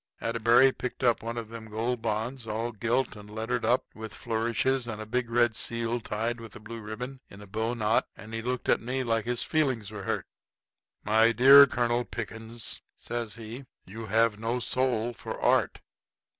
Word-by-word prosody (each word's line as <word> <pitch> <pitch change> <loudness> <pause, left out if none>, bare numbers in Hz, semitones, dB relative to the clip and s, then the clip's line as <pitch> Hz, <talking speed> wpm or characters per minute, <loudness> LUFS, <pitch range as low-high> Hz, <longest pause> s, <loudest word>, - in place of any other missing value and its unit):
Atterbury 115 +3 +4
picked 125 0 -6
up 120 -2 +3
one 115 +1 -4
of 115 -2 -5
them 115 -1 -9
Gold 115 +3 -2
Bonds, 115 +2 -2
all 115 +2 -2
gilt 120 +4 0
and 105 0 -11
lettered 110 +3 -2
up 120 +3 +2
with 110 -1 -8
flourishes 120 +3 0
and 110 -2 -5
a 110 - -5
big 120 +2 -1
red 120 -1 +3
seal 115 +1 -1
tied 115 +3 -2
with 115 -2 -10
a - - -8
blue 115 +2 -8
ribbon 125 +5 -6
in 100 - -12
a 105 - -10
bowknot, 110 +2 0
and 110 +1 -10
he 115 - -2
looked 125 +1 -3
at - - +3
me 130 +3 -2
like 115 -3 0
his 120 0 -1
feelings 130 -9 0
was 105 -3 -7
hurt. - - -1 0.8
"My 110 +2 +4
dear 135 +4 +9
Colonel 120 -1 +1
Pickens," 115 0 -6
says 120 -3 -4
he, 115 +3 -8 0.2
"you 110 +4 -8
have 110 0 +2
no 115 +3 -1
soul 120 -1 0
for - - -7
Art. - - +2
115 Hz, 185 wpm, -28 LUFS, 110-120 Hz, 0.8 s, dear